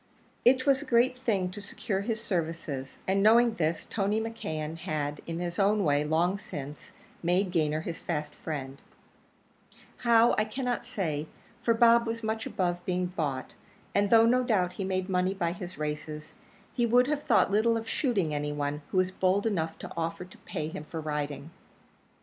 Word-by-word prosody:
It 255 +1 +5
was 275 -1 +4
a - - -7
great 245 +1 +3
thing 200 -8 0
to 205 - -7
secure 205 -1 -3
his 220 +2 -2
services; 160 -9 -3
and 195 +1 +2
knowing 230 +3 +6
this, 165 -4 -1
Tony 205 0 0
McKeon 165 -9 -4
had, 150 -4 -3
in 165 0 -3
his 175 +1 -3
own 205 +1 +3
way, 145 -2 +2
long 170 +6 +1
since, 145 -3 -8 0.3
made 180 +2 +1
Gayner 155 -3 +1
his 170 -1 -5
fast 150 -3 -3
friend; 140 -4 -6 1.2
how, 235 -1 +5
I 215 - +2
cannot 245 +1 -2
say, 160 - -2 0.3
for 230 - +2
Bob 235 0 +5
was 230 0 -3
much 220 0 -2
above 175 -1 -1
being 180 0 0
bought, 150 -7 -3 0.4
and 200 0 +2
though, 225 0 +7
no 250 +2 +4
doubt, 190 -7 +1
he 195 - -4
made 185 -1 -1
money 185 0 +1
by 170 -3 0
his 180 -2 -7
races, 150 0 -5 0.4
he 240 -2 +1
would 245 +2 +5
have 290 +1 -1
thought 200 - +3
little 225 +3 +3
of 225 0 -5
shooting 205 - 0
any 150 0 -1
one 145 0 -2
who - - -2
was 185 0 +3
bold 190 +2 +1
enough 165 -7 -1
to - - -8
offer 165 +2 -3
to 180 - -16
pay 155 -5 -4
him 155 - -6
for 160 +2 -6
riding. 150 0 -4
185 Hz, 180 wpm, -29 LUFS, 155-225 Hz, 1.2 s, though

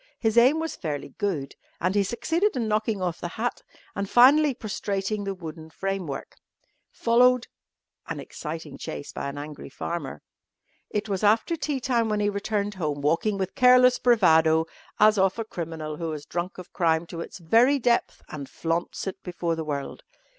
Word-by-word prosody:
His 225 -1 0
aim 255 +7 +6
was 325 0 -3
fairly 150 -4 -4
good, 175 -10 -2 0.3
and 185 +2 0
he 205 - +3
succeeded 325 - 0
in 235 -3 -1
knocking 215 -2 0
off 175 -2 -2
the - - -3
hat 240 +2 -2 0.3
and 200 -1 -3
finally 275 +3 +6
prostrating 205 -2 -3
the 195 0 -3
wooden 160 -2 -9
framework. 185 -4 -4 0.5
Followed 245 +1 +4 0.6
an - - -4
exciting 155 -2 -7
chase 145 - -6
by 140 - -4
an 140 - -8
angry 150 0 -7
farmer. 170 -6 -5 0.7
It 210 +1 -2
was 195 -2 -2
after 220 +10 +3
tea 295 -3 -2
time 240 -3 +1
when 210 -1 0
he 205 0 +2
returned 205 0 -2
home, 150 -6 -3
walking 170 +8 +1
with 190 -1 -3
careless 250 -1 +6
bravado 160 -9 +4 0.3
as 215 -1 +5
of 190 +1 +2
a 225 - -3
criminal 160 -5 -5
who 165 0 -3
has 150 -1 -7
drunk 175 +2 -4
of 180 - -11
crime 165 -1 +2
to 165 0 -7
its - - -8
very 230 - +4
depth 240 -2 0
and 140 -3 -7
flaunts 165 +1 -2
it 190 - -5
before 175 -2 -2
the 160 - -3
world. 145 -2 -4
195 Hz, 175 wpm, -26 LUFS, 165-230 Hz, 0.7 s, aim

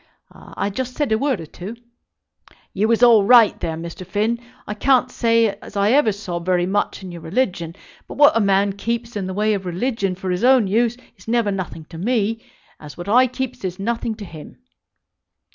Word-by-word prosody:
"I 200 - -5
just 250 +4 -4
said 295 -6 -1
a 220 - +3
word 275 -6 0
or - - -7
two." 185 +8 -9 1.0
"You 215 - +1
was 230 +1 +2
all 230 -4 +7
right, 230 0 +6
there, 160 -1 -3
Mr. 170 +2 -7
Finn. 215 +5 -1 0.3
I 210 - -4
can't 255 +3 +2
say 230 -1 +2
as - - -9
I 200 +2 +3
ever 270 -4 +4
saw 190 -4 -5
very 175 0 0
much 200 +1 -1
in 185 - -7
your 170 -1 -9
religion; 170 -3 -2 0.3
but - - -9
what 290 +1 +6
a - - +4
man 200 -1 +2
keeps 230 +3 -4
in 195 -3 -3
the 190 - -4
way 215 +1 +1
of 195 -2 -3
religion 195 +1 -1
for 185 0 -4
his 180 +3 -2
own 255 -3 +5
use 230 +4 +1 0.2
is 185 - -18
never 230 -2 +1
nothing 175 -5 -5
to 165 - -8
me; 225 +1 -1 0.4
as 150 -1 -11
what 175 +2 -7
I 250 +4 +5
keeps 255 -2 -5
is 185 -1 -4
nothing 230 +2 -2
to 210 -2 -9
him." 160 -4 -11
210 Hz, 205 wpm, -21 LUFS, 185-235 Hz, 1.0 s, all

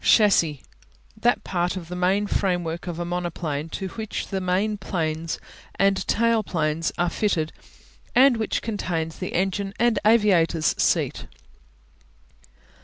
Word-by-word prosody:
Chassis - - +6
(shas 210 -3 +6
see) 150 -5 0 0.5
That 240 +3 +1
part 180 0 -1
of 170 -3 -7
the 180 - -6
main 185 +3 +2
framework 175 -4 -1
of 170 -2 -4
a 175 - -3
monoplane 170 -4 -3
to 190 +3 -4
which 220 +2 -5
the 190 -1 -2
main 190 +4 0
planes 160 -3 -2 0.4
and 195 -1 +2
tail 230 0 +3
planes 160 -4 -1
are 175 - +2
fitted 160 -7 0 0.6
and 255 -1 +6
which 220 -1 -1
contains 170 -7 -3
the 185 - -4
engine 195 +2 -1
and 240 -1 +3
aviators 185 -8 +3
seat. - - +1
180 Hz, 140 wpm, -24 LUFS, 165-210 Hz, 0.6 s, Chassis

